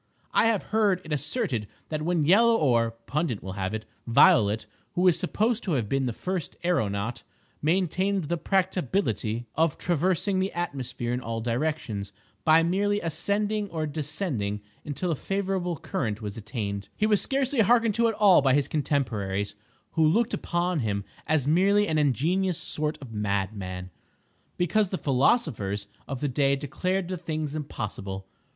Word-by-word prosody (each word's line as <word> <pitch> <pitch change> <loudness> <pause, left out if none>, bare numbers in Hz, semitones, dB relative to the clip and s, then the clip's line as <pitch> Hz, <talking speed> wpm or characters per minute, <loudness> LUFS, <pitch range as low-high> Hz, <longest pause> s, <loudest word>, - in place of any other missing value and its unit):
I - - +4
have 225 -3 +2
heard 205 -4 +3
it 155 - -3
asserted 145 - -1 0.2
that 155 -1 -2
when 165 -1 +1
Yellow 225 +7 +6
or 120 - +3 0.2
(Pundit 145 -4 -1
will 95 - -5
have 95 +2 -2
it) 110 - -5 0.2
Violet, 110 -2 +5 0.3
who 180 +1 +3
is 175 - +4
supposed 220 +5 0
to 180 - 0
have 120 -7 0
been 135 +2 0
the - - 0
first 180 +6 -4
aeronaut, 115 - 0 0.4
maintained 185 +4 +1
the 165 +3 -1
practicability 180 - 0
of 160 -1 +1
traversing 185 +3 +1
the 190 +1 0
atmosphere 130 -8 -3
in 125 - -2
all 115 -1 -3
directions, 115 -4 -2 0.3
by 160 +1 +6
merely 205 +4 +1
ascending 205 +5 -1
or 160 -3 -2
descending 145 - -2 0.2
until 160 +5 -2
a - - +1
favorable 190 0 -2
current 110 -6 -3
was 105 -2 -5
attained, 105 -3 -4
he 215 - +1
was 210 -2 +3
scarcely 270 -1 0
hearkened 230 0 +4
to 235 +2 +3
at 225 - 0
all 205 -6 +6
by 135 -1 +4
his 145 -1 +2
contemporaries, 105 -10 -1 0.4
who 160 - +2
looked 215 +10 +3
upon 175 0 0
him 100 -5 -1 0.2
as 150 -4 +2
merely 200 +6 +4
an 155 -1 +1
ingenious 165 +6 +1
sort 150 0 -2
of 120 -4 -10
madman, 95 -3 -2 0.7
because 180 +3 +2
the 185 - -2
philosophers 125 - +1
(?) - - -33
of 135 -3 -5
the 145 - +1
day 140 +1 +2
declared 180 +7 -2
the 185 0 -3
thing 155 -2 -3
impossible. 100 -10 -5
155 Hz, 160 wpm, -27 LUFS, 115-185 Hz, 0.7 s, Yellow